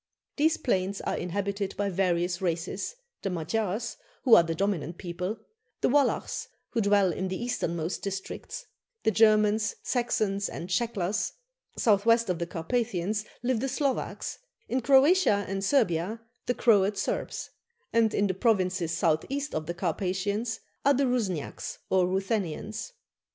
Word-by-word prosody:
These 315 +2 +3
plains 195 -4 0
are - - -1
inhabited 200 +2 -2
by 205 -1 0
various 180 0 +1
races 185 - -2 0.3
the 195 - -2
Magyars, 195 +5 -2 0.3
who 250 - +5
are 220 - +10
the 165 -1 -2
dominant 175 -3 -1
people; 180 +4 -4 0.4
the - - +3
Wallachs, 285 +1 +1 0.2
who 230 - +1
dwell 200 -3 +4
in 190 +4 -2
the 185 0 -3
easternmost 170 -8 -2
districts; 195 -1 -5 0.4
the 220 - +3
Germans, 215 0 +4
Saxons, 215 -5 0
and 175 - -6
Shecklers. 205 -1 0 0.4
South 205 -1 +3
west 230 -3 +4
of 175 - -3
the 170 - -2
Carpathians 205 +3 -1 0.2
live 245 -2 +1
the 270 - -1
Slovaks; 275 0 -2 0.3
in 255 +1 0
Croatia 270 - +5
and 195 0 -2
Servia 205 - +2 0.3
the 245 - +1
Croat 205 -3 +4
Serbs; - - -3 0.4
and 230 -1 +4
in 205 - +2
the 190 - +1
provinces 185 -5 +1
south 165 -2 +2
east 285 +2 -3
of 155 0 -3
the 175 - -3
Carpathians 195 +5 -1 0.2
are 280 0 +5
the 275 +2 +2
Rusniaks 210 - -2
or 185 -1 +4
Ruthenians. 195 - -2
200 Hz, 145 wpm, -28 LUFS, 180-230 Hz, 0.4 s, are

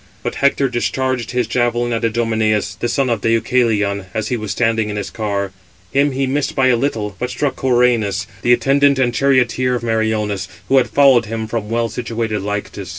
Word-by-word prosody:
But - - -2
he - - -8
[Hector] 140 0 +2
discharged 130 0 -1
his 125 -1 0
javelin 120 +1 0
at 115 - -2
Idomeneus, 110 -2 0
the 120 - -3
son 135 +1 +1
of 120 -2 -1
Deucalion, 110 -4 +1
as 110 -1 -2
he 125 - 0
was 110 -3 -5
standing 115 -1 0
in 105 - -4
his 100 -2 -4
car: 100 -3 -2 0.4
him 140 0 +2
he 135 +1 0
missed 135 +2 -1
by 130 -1 +3
a 125 - +4
little, 110 -6 -2
but 125 - -2
struck 140 +2 -2
Coeranus, 120 -6 +1 0.2
the 120 - +2
attendant 140 +2 +3
and 125 -2 +1
charioteer 130 -1 +2
of 120 - -4
Meriones, 110 -4 -1 0.2
who 135 - +4
had 125 -2 +3
followed 130 -1 +5
him 110 0 -3
from 110 -1 -4
well 115 0 0
situated 115 -2 -3
Lyctus. 105 +1 -5
115 Hz, 195 wpm, -18 LUFS, 110-125 Hz, 0.4 s, followed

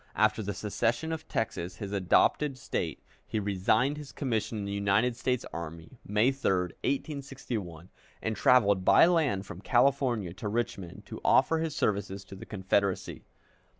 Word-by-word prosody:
After 110 +1 +2
the 100 -1 -4
secession 115 +9 -1
of 160 -1 -5
Texas, 90 -5 -3
his 100 -3 -6
adopted 105 +8 +2
State, 85 - -3 0.2
he 110 - -1
resigned 105 +8 +1
his 150 -2 -8
commission 115 -5 -2
in 100 - -3
the 100 - -4
United 100 +4 +2
States 125 0 -1
Army, 85 +7 -8
May 105 +6 +2
3, 135 -6 0 0.3
1861, 130 - -4 0.3
and 110 0 -2
traveled 100 -7 +4
by 100 - +7
land 150 - +2
from 95 -1 -9
California 120 -6 +2
to 100 +3 -6
Richmond 105 -5 -3
to - - -8
offer 165 - +4
his 160 -2 -2
services 100 -5 -1
to 95 - -10
the 95 - -10
Confederacy. 100 -1 -1
110 Hz, 150 wpm, -29 LUFS, 95-130 Hz, 0.3 s, by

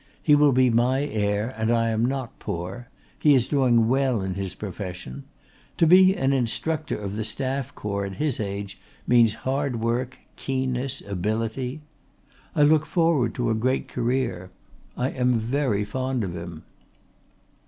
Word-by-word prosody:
He 150 - +4
will 145 -1 +6
be 130 -1 +4
my 125 +4 +2
heir 105 -3 -1
and 110 0 -1
I 115 -1 +2
am 110 +2 +1
not 130 -2 -4
poor. 95 +9 -5 0.3
He 150 -2 +5
is 125 -3 +2
doing 125 -5 +3
well 130 -4 +1
in 95 -1 -2
his 95 0 -4
profession. 90 -9 -7 0.5
To - - +4
be 185 +3 +6
an 135 +1 +1
Instructor 155 +5 -1
of 100 -1 -5
the 110 - -2
Staff 130 +4 -3
Corps 100 -1 -3
at 95 -1 -6
his 150 0 -1
age 100 -1 -5 0.3
means 115 -3 +4
hard 135 -2 -1
work, 120 +3 -1 0.2
keenness, 130 0 -2
ability. 110 - -2 0.7
I 150 - +4
look 155 +1 +4
forward 165 -9 +1
to 120 -2 0
a - - +2
great 125 +4 0
career. 120 -7 -2 0.5
I 125 +2 0
am 125 -1 +1
very 115 -2 0
fond 130 +1 -2
of 90 -3 -4
him. 85 -2 -8
120 Hz, 155 wpm, -25 LUFS, 105-135 Hz, 0.7 s, will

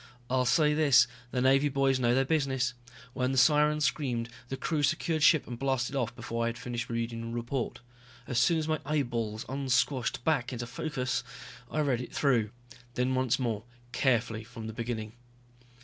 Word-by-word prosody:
I'll 130 -1 +2
say 150 +4 +4
this, 150 -4 +5 0.2
the 125 0 -1
Navy 135 +2 +4
boys 135 -1 +2
know 120 -1 +3
their 135 +1 +3
business. 135 -4 0 0.4
When 130 0 0
the 135 - -1
sirens 150 +3 +4
screamed, 125 -4 -1 0.2
the 135 - -3
crew 155 +1 -1
secured 160 +2 +1
ship 155 0 +5
and 120 -1 -7
blasted 135 -1 -1
off 120 -3 -1
before 115 -1 -3
I - - +1
had 115 0 -3
finished 120 -1 -4
reading 115 0 -3
the 115 - -5
report. 120 +1 -3 0.4
As 120 - 0
soon 165 +8 +4
as 155 -1 -2
my 155 -1 0
eyeballs 120 -7 -2
unsquashed 130 -1 0
back 135 -5 +1
into 120 -1 -4
focus 130 0 -2 0.5
I 155 - 0
read 130 -5 +1
it 125 - -9
through, 120 -7 +2 0.5
then 125 +1 +1
once 130 -2 +1
more, 115 -5 -2 0.3
carefully, 115 -5 +1
from 110 0 -9
the 110 - -5
beginning. 115 -1 -4
130 Hz, 180 wpm, -29 LUFS, 120-140 Hz, 0.5 s, this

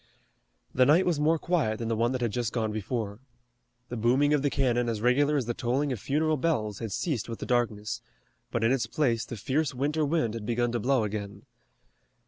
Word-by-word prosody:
The 125 0 +4
night 165 +6 +5
was 170 -4 +1
more 160 +2 +3
quiet 155 -11 0
than 115 - -4
the 115 - 0
one 115 +2 +1
that 130 - -2
had 120 -3 0
just 120 0 -2
gone 110 -3 0
before. 110 -1 -3 0.7
The 120 - -4
booming 130 +6 +3
of 150 - +3
the 145 - +1
cannon 120 -4 +1
as 110 -2 -2
regular 140 +6 +3
as 130 - 0
the 120 - -1
tolling 130 +5 0
of 125 - -3
funeral 155 +6 +1
bells 110 - -1
had 110 -3 -4
ceased 125 - -2
with 115 - -4
the - - -6
darkness, 110 -4 -1 0.5
but 115 - -1
in 115 - +3
its 135 -2 +1
place 120 -8 0
the 120 - -7
fierce 135 +6 -1
winter 150 +4 0
wind 145 -7 +1
had 110 -2 -6
begun 120 0 +1
to 120 - -1
blow 130 +1 +2
again. 100 -1 -5
120 Hz, 215 wpm, -28 LUFS, 115-145 Hz, 0.7 s, night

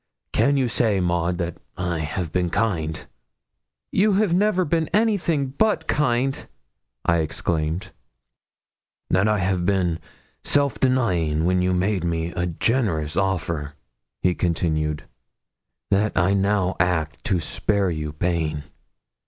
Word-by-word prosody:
Can 140 0 +3
you 130 -2 +2
say, 115 -4 +1
Maud, 85 0 0
that 85 -1 -4 0.2
I 90 -2 -1
have 80 +2 -3
been 90 -1 0
kind?' 85 -6 -1 0.9
'You 205 +2 +3
have 195 -2 +2
never 185 -1 +2
been 160 +1 +1
anything 180 - +2
but 215 +11 +1
kind,' 135 -1 0 0.6
I 85 - +3
exclaimed. 80 +4 -1 1.2
'That 95 +3 +3
I've 95 -4 +1
been 90 -3 +1 0.4
self 140 -2 +1
denying 90 - +1
when 90 +1 +2
you 90 0 +1
made 95 0 0
me 85 0 -1
a 90 0 -2
generous 85 - 0
offer?' 85 -6 -1 0.5
he 90 - +3
continued. 80 -3 -1 0.9
'That 105 +2 +2
I 95 +1 +3
now 100 -1 +1
act 80 -4 0
to 95 -5 +1
spare 100 +4 0
you 75 -2 -3
pain? 80 -2 -1
90 Hz, 125 wpm, -23 LUFS, 85-115 Hz, 1.2 s, Can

